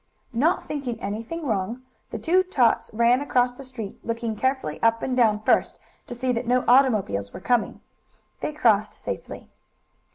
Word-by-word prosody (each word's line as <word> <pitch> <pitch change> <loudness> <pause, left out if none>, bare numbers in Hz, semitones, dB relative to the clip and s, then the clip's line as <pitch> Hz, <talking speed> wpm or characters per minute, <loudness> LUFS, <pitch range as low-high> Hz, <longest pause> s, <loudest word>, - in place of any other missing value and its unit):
Not 300 +10 +1
thinking 260 -6 -4
anything 230 +11 -5
wrong, 225 +2 -2 0.3
the - - -5
two 360 +3 +3
tots 265 -11 +1
ran 235 +4 +3
across 250 -3 +1
the 275 - -11
street, 235 -6 -8
looking 230 -1 -3
carefully 260 - -1
up 230 0 +2
and 255 - -1
down 220 -4 +3
first, - - +2 0.3
to 245 - -6
see 255 +1 -1
that 235 0 -2
no 250 +1 +2
automobiles 215 - +3
were - - -7
coming. 240 +4 0 0.6
They - - -3
crossed 215 -8 +2
safely. - - -7
240 Hz, 160 wpm, -24 LUFS, 220-260 Hz, 0.6 s, two